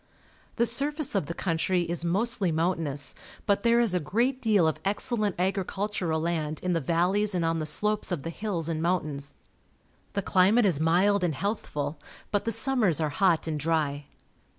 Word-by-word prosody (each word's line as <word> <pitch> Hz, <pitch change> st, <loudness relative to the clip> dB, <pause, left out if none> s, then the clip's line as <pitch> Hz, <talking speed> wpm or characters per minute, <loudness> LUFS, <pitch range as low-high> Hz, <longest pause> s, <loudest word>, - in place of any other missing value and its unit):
The 235 Hz, -, +2 dB
surface 285 Hz, +5 st, 0 dB
of 195 Hz, -8 st, 0 dB
the 170 Hz, -, -5 dB
country 175 Hz, +1 st, 0 dB
is 170 Hz, 0 st, -2 dB
mostly 190 Hz, +1 st, 0 dB
mountainous, 160 Hz, -4 st, -1 dB, 0.3 s
but 200 Hz, -1 st, +2 dB
there 235 Hz, 0 st, +4 dB
is 230 Hz, -6 st, +2 dB
a 180 Hz, -, +2 dB
great 240 Hz, -, 0 dB
deal 205 Hz, -7 st, +3 dB
of 160 Hz, -, -1 dB
excellent 210 Hz, 0 st, 0 dB
agricultural 190 Hz, -2 st, -1 dB
land 155 Hz, -2 st, -2 dB
in 180 Hz, -1 st, 0 dB
the 165 Hz, -, 0 dB
valleys 185 Hz, +7 st, +1 dB
and 170 Hz, -2 st, 0 dB
on 165 Hz, 0 st, 0 dB
the 155 Hz, -, -2 dB
slopes 210 Hz, +7 st, -1 dB
of 160 Hz, -6 st, -2 dB
the 165 Hz, -, -4 dB
hills 180 Hz, -4 st, -3 dB
and 160 Hz, -1 st, -2 dB
mountains. 150 Hz, -5 st, -1 dB, 0.8 s
The 200 Hz, -, -1 dB
climate 200 Hz, +6 st, +4 dB
is 175 Hz, -8 st, +2 dB
mild 180 Hz, +5 st, +3 dB
and 165 Hz, -5 st, 0 dB
healthful, 150 Hz, -5 st, -3 dB, 0.3 s
but 205 Hz, 0 st, 0 dB
the 230 Hz, -, 0 dB
summers 225 Hz, -, +2 dB
are 155 Hz, -2 st, 0 dB
hot 170 Hz, +2 st, +2 dB
and 155 Hz, -2 st, -2 dB
dry. 145 Hz, -2 st, -1 dB
180 Hz, 175 wpm, -27 LUFS, 160-205 Hz, 0.8 s, there